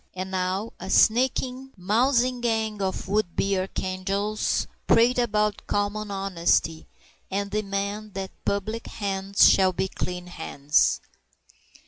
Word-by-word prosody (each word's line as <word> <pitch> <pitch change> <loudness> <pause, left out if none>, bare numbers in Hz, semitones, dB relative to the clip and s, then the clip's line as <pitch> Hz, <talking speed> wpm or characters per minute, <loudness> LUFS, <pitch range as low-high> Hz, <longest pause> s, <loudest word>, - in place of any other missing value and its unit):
And 185 +1 -5
now 190 +4 -2
a 185 - -7
sneaking, 255 +4 +2
mousing 240 +6 +2
gang 220 -3 -1
of 190 -1 -2
would 200 -3 0
be 195 0 +1
archangels 195 +2 -1 0.2
prate 245 +2 +4
about 210 -3 0
common 205 +1 -1
honesty, 180 -4 0 0.4
and 200 +1 -2
demand 200 0 -3
that 195 -1 -4
public 215 +3 -2
hands 195 -1 +2
shall 190 -1 +4
be 190 - -1
clean 180 -1 -5
hands! 150 -4 +1
200 Hz, 115 wpm, -25 LUFS, 190-215 Hz, 0.4 s, prate